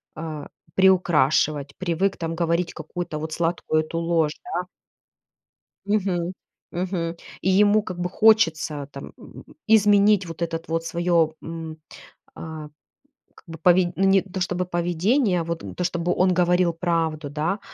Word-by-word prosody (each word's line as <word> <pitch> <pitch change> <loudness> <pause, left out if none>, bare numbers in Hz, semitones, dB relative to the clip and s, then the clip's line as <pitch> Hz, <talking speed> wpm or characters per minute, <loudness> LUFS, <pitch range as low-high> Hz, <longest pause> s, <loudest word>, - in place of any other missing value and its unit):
а, 155 -2 -6 0.3
приукрашивать, 155 -6 +3
привык 185 +2 0
там 165 -1 -3
говорить 170 +1 0
какую-то 160 0 -5
вот 155 +1 -5
сладкую 165 -1 0
эту 165 - -5
ложь, 165 -2 +1
да. 180 - -3 1.2
Мгм 185 -4 0 0.4
мгм. 175 -2 -2 0.3
И 190 - +1
ему, 205 +2 +4
как 185 -4 -7
бы, 180 0 -1
хочется 165 -10 +3
там, 140 - -9
м, - - -13 0.2
изменить 205 -3 +4
вот 165 +1 -5
этот 165 0 -4
вот 165 0 -2
своё, 170 -2 +1
м, 165 -1 -7 0.6
а, 160 -2 -8 0.7
как - - -20
бы, 165 -1 -9
поведь 175 +1 +4
ну, 195 - +1
не 195 0 +5
то 190 0 -7
чтобы 180 0 -2
поведение, 180 - +1
вот, 170 0 -4
м, - - -8
то, 180 - -3
чтобы 175 0 -1
он 185 0 +3
говорил 180 -1 +2
правду, 165 -3 -1
да. 160 +7 -2
170 Hz, 145 wpm, -23 LUFS, 165-185 Hz, 1.2 s, не